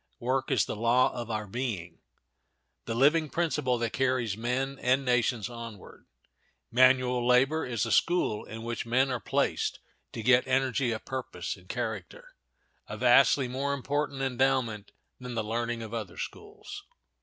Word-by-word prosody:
Work 130 +2 -1
is - - +2
the - - -4
law 120 +4 +3
of 120 -2 -6
our 110 -1 -2
being, 100 -7 -4 0.9
the 115 - -3
living 150 +5 +3
principle 150 -7 0
that 115 -1 -2
carries 125 -5 0
men 130 +4 -2
and 130 +2 +2
nations 120 -3 +1
onward. 115 -4 -10 0.6
Manual 125 0 +4
labor 135 +5 +3
is 120 -2 -1
a 115 - -3
school 170 -11 +2
in 110 0 -8
which 120 0 -3
men 130 +3 +2
are 125 - -1
placed - - 0 0.4
to 115 - -5
get 125 +2 +4
energy 130 -1 +1
of 110 - -5
purpose 130 -1 -4
and - - -19
character—a - - -8
vastly 135 -3 +5
more 140 +3 -2
important 140 0 -2
endowment 130 -5 0 0.3
than 125 -1 -7
the 110 - -1
learning 115 +1 -2
of 110 0 -8
other 110 -6 -5
schools. 415 -1 -8
125 Hz, 150 wpm, -29 LUFS, 115-135 Hz, 0.9 s, vastly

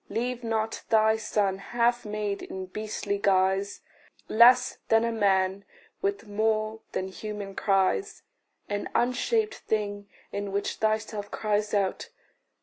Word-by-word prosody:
Leave 245 +1 -2
not 225 -1 -1
thy 220 0 +4
son 205 -3 0
half 240 +3 0
made 210 -1 -3
in 190 0 -6
beastly 205 +1 -3
guise 195 0 +2 0.5
Less 245 +2 +6
than 225 0 +4
a 230 - 0
man, 195 -3 +2 0.4
with 400 -8 -1
more 215 +1 0
than 185 - -2
human 205 0 -6
cries 195 - +1 0.4
An 205 0 -3
unshaped 425 - +1
thing 205 - -3 0.2
in 200 0 -3
which 200 +1 -2
thyself 215 -1 -1
cries 210 0 -1
out! 195 -2 -1
215 Hz, 125 wpm, -27 LUFS, 200-225 Hz, 0.5 s, Less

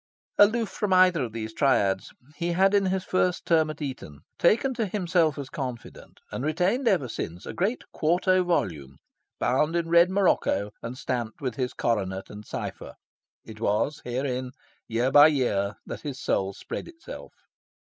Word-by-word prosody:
Aloof 220 +2 +5
from 205 -3 -1
either 185 -3 +5
of 120 -3 -3
these 110 0 -5
triads, 100 -9 +1 0.2
he 170 +3 -1
had 195 +3 +3
in 200 -1 +3
his 185 0 0
first 180 -1 0
term 160 -3 +3
at 155 0 -6
Eton 100 - -7 0.2
taken 245 +9 +3
to 230 -4 -1
himself 175 -6 +1
as 140 -2 -6
confidant, 130 -7 -7
and 125 - -4
retained 180 - +1
ever 170 - +2
since, 90 -6 -6
a - - -6
great 205 +7 -1
quarto 180 +3 +2
volume, 75 - -2 0.4
bound 150 +6 +1
in 170 -1 -1
red 170 +1 +6
morocco 185 - +1
and 120 +2 -6
stamped 120 -5 -3
with 130 -4 -3
his 125 +1 -3
coronet 95 -5 -1
and 105 0 -10
cypher. - - -6 0.5
It 110 -1 -11
was 115 +8 0
herein, 125 0 -3 0.3
year 120 +3 0
by 145 +1 +9
year, 110 -9 0
that - - -7
his 140 -3 -6
soul 95 -6 0
spread - - -6
itself. 345 +9 -11
145 Hz, 165 wpm, -26 LUFS, 115-185 Hz, 0.5 s, by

